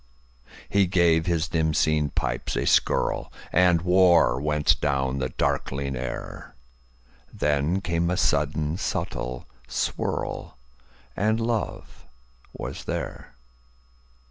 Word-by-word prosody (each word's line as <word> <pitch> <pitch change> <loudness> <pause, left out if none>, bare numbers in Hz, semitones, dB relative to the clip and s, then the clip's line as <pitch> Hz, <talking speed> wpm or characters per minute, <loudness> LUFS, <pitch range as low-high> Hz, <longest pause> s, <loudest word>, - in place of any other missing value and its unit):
He 100 -2 +3
gave 85 -2 +3
his 85 -1 +1
dim 80 -1 0
seen 75 -1 +2
pipes - - -2
a - - -1
skirlAnd 90 -1 +2
war 90 -7 +4
went 75 0 +2
down 70 -1 0
the 65 -1 -1
darkling 70 +1 -1
air; 65 0 -6 0.8
Then 75 +6 0
came 85 -2 0
a 90 - 0
sudden 80 +2 +1
subtle 60 -8 -3 0.2
swirl, - - -3 0.6
And 110 +4 +1
love 115 -1 -3 0.4
was - - -7
there. - - -5
80 Hz, 100 wpm, -25 LUFS, 70-90 Hz, 0.8 s, war